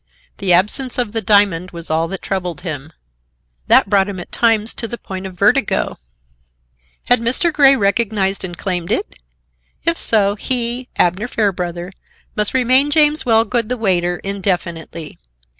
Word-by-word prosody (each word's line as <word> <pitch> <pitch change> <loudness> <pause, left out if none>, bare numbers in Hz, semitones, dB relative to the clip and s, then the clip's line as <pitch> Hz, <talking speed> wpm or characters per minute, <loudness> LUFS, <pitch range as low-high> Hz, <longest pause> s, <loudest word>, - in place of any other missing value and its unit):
The 195 -2 0
absence 210 +9 +1
of 240 -4 -1
the 225 0 -2
diamond 195 -4 +2
was 170 -2 -7
all 160 +1 +1
that 190 +2 -7
troubled 180 -3 -3
him. 155 -4 -6 0.8
That - - +5
brought 195 0 +2
him 190 -2 -6
at 175 - -10
times 225 -2 +2
to 230 - -4
the 235 - -6
point 190 -3 -7
of 185 -1 -12
vertigo. 215 +5 +1 1.0
Had 245 - +3
Mr. 255 +9 0
Grey 275 -2 +6
recognized 200 -3 0
and 175 -2 -6
claimed 180 -1 -3
it? 400 - -1 0.7
If 335 0 +2
so, 200 -3 +2
he, 240 +3 -2
Abner 185 +6 +1
Fairbrother, 180 -5 -2 0.4
must 210 +4 -1
remain 260 +3 +4
James 300 0 +3
Wellgood, 230 0 +2
the 250 - -2
waiter, 175 -5 0
indefinitely. 175 -5 -3
200 Hz, 150 wpm, -18 LUFS, 180-235 Hz, 1.0 s, Grey